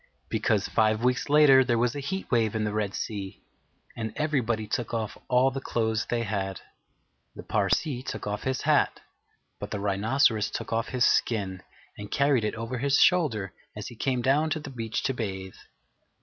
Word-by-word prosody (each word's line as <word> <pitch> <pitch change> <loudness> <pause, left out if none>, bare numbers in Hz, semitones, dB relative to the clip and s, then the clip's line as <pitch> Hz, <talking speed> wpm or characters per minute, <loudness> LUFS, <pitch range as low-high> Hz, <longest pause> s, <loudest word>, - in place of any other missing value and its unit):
Because, - - +1
five 110 0 +2
weeks 125 +3 +1
later, 145 -3 +7
there 120 -2 +1
was 120 +1 +1
a - - -3
heat 190 +8 -4
wave 115 -3 +2
in 110 - 0
the 105 -1 -2
Red 105 -2 -1
Sea, 100 -2 -5 0.5
and 110 -1 -4
everybody 120 -8 0
took 120 +1 -3
off 110 -2 -3
all 130 +1 +3
the 135 +1 -5
clothes 110 -3 -1
they 120 -1 -1
had. 95 -3 -3 0.8
The - - -8
Parsee 110 - 0
took - - -6
off 105 0 -3
his 130 0 -2
hat; - - +2 0.6
but - - -6
the 105 - -3
Rhinoceros 105 +3 +2
took - - -5
off 115 0 0
his 125 -2 +2
skin 95 -5 +1 0.4
and 105 0 -7
carried 140 -4 +2
it 105 - -1
over 115 +2 -4
his 140 +2 +2
shoulder 125 - +3 0.2
as 105 - -5
he 120 - -11
came 125 +1 -1
down 145 +5 +3
to 155 - -1
the 150 -2 -8
beach 115 -3 -3
to 135 - 0
bathe. 95 -5 -5
115 Hz, 185 wpm, -27 LUFS, 105-135 Hz, 0.8 s, later